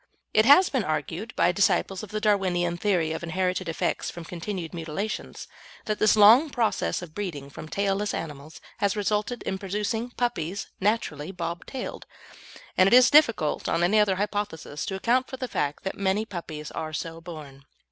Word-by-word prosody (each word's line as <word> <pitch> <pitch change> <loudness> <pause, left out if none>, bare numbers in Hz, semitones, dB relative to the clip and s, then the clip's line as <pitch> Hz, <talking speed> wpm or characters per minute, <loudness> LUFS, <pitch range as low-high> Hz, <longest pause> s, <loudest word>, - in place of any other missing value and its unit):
It 215 - +5
has 290 +8 +8
been 260 -5 0
argued, 160 +7 -3
by 175 - +3
disciples 195 0 +1
of 215 - -9
the 215 0 -3
Darwinian 185 -5 +1
theory 175 -4 +1
of 160 - -3
inherited 180 +1 -1
effects 165 - -1
from 170 -1 -8
continued 175 0 -5
mutilations, 170 +6 -5 0.4
that 215 -1 -2
a 215 0 +4
long 235 +9 +8
process 230 -7 0
of 160 -3 -10
breeding 155 -9 -5
from 155 - -9
tailless 200 +2 0
animals 150 -1 -6 0.2
has 200 -1 +1
resulted 210 +3 -1
in 190 - -3
producing 210 +4 -2
puppies 220 -6 -2
naturally 190 -6 -1
bob 170 -2 -5
tailed, 260 -2 -6 0.7
and 185 - +5
it 195 - +3
is 255 0 +7
difficult, 230 - +3
on 165 +1 +1
any 205 +5 +4
other 205 -2 +3
hypothesis, 200 -7 -3
to 190 - -2
account 245 +6 +1
for 260 - -7
the 255 - -4
fact 145 -10 -2
that 190 - -3
many 200 +2 +1
puppies 165 -7 -7
are 155 -1 -5
so 165 +1 -5
born. 150 -5 -10
190 Hz, 175 wpm, -26 LUFS, 165-215 Hz, 0.7 s, has